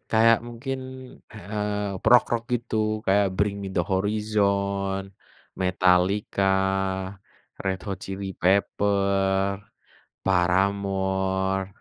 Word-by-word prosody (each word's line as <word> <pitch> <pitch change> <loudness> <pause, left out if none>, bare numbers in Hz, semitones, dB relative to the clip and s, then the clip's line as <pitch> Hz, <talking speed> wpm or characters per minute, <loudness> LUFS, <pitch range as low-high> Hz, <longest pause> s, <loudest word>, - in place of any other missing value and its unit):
Kayak 115 +1 +5
mungkin, 120 +3 -5 0.5
eee, 105 -1 -3
rock-rock 120 0 +4
gitu, 110 -2 -1
kayak 100 0 +3
Bring 100 0 +1
Me 100 - -4
The 90 - +1
Horizon, 100 0 0 0.5
Metallica, 95 +2 +2 1.1
Red 95 -1 -1
Hot 95 -3 -3
Chili 95 -1 -6
Pepper, 100 0 +1 0.7
Paramore, 95 +1 +1
100 Hz, 80 wpm, -25 LUFS, 95-105 Hz, 1.1 s, Kayak